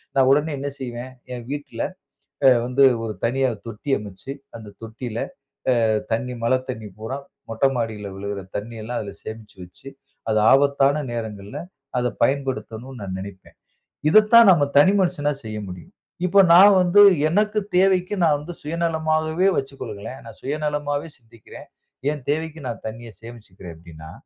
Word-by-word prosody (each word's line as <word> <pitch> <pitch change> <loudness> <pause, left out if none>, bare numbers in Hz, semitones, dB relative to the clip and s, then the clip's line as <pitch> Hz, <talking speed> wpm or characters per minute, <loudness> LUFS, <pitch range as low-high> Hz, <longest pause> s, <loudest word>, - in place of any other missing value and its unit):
நா 135 - +5
உடனே 150 +3 +2
என்ன 140 +1 -3
செய்வேன்? 125 0 -6 0.2
ஏன் 120 - -8
வீட்டுல 145 -5 -5 0.7
அ - - +9 0.2
வந்து 130 +2 +3 0.2
ஒரு 110 - -3
தனியா 130 +2 +1 0.2
தொட்டி 115 +6 -7
அமச்சு 105 +5 -8 0.2
அந்த 110 -2 -10
தொட்டியில 115 +1 -6 0.7
அ - - +3 0.3
தண்ணீ 125 +3 -1
மழத் 130 +2 +1
தண்ணீ 110 -4 -5
பூராம் 135 +6 -6 0.3
மொட்ட 115 +3 -1
மாடில 110 -4 -3
விழுகுற 100 +1 -5 0.2
தண்ணீயெல்லாம் 115 +2 -5
அதுல 100 -2 -6
சேமிச்சு 110 -2 -9
வச்சு, 90 +9 -12 0.4
அது 110 -1 +2
ஆபத்தான 140 +1 +3
நேரங்கள்ல 105 -3 -6 0.4
அத 125 - +1
பயன்படுத்தனும்னு 130 -2 -2
நா 100 - -5
நினைப்பேன். 95 -1 -10 0.5
இதத்தான் 215 +3 +7
நம்ம 170 -5 +4
தனி 185 +8 +6
மனுஷனா 170 -5 +1
செய்ய 110 -1 -6
முடியும். 90 - -10 0.3
இப்போ 195 +2 +6
நா 175 - +9 0.2
வந்து 180 +3 +5 0.3
எனக்கு 210 +4 +1 0.2
தேவைக்கு 185 +1 +3
நா 165 - +5
வந்து 160 +4 -8
சுயநலமாகவே 160 +2 0
வச்சுக்கொள்ளுங்களேன். 135 -4 -6
நான் - - -12
சுயநலமாவே 145 +1 -2
சிந்திக்கிறேன். 115 -3 -15 0.4
என் 145 -4 -7
தேவைக்கு 160 0 -3
நா - - -2
தண்ணீய 115 +1 -8
சேமிச்சுக்குறேன் 105 -7 -11
அப்டின்னா, 80 -1 -12
130 Hz, 140 wpm, -22 LUFS, 110-150 Hz, 0.7 s, அ